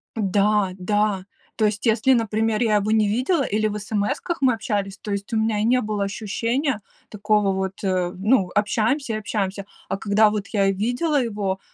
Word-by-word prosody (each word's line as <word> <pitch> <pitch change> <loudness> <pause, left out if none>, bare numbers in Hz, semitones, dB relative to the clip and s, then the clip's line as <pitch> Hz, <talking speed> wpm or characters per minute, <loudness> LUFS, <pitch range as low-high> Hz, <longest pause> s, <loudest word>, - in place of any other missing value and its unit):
Да, 205 -1 +2
да. 205 0 0 0.3
То 215 - +1
есть 210 +2 -1
если, 230 +4 +4
например, 220 -1 0
я 215 -3 +3
его 210 +1 +1
не 215 -1 +3
видела 260 - +1
или 215 -1 0
в 210 0 -3
смс-ках 215 - -2
мы 255 -2 +4
общались, 205 -3 -3
то 210 - -6
есть 200 +3 -4
у - - +2
меня 220 -1 +1
и - - 0
не 250 +2 +3
было 210 -1 -2
ощущения 230 +5 -2 0.3
такого 210 -1 +1
вот, 190 +1 -3
э, 185 -2 0
ну, 200 -1 +2
общаемся 225 +5 0
и - - -1
общаемся, 200 -2 -3 0.2
а 195 - -1
когда 210 +1 +3
вот 210 -2 -3
я 200 -3 +2
видела 245 - 0
его, 200 -4 -2
210 Hz, 185 wpm, -23 LUFS, 200-225 Hz, 0.3 s, если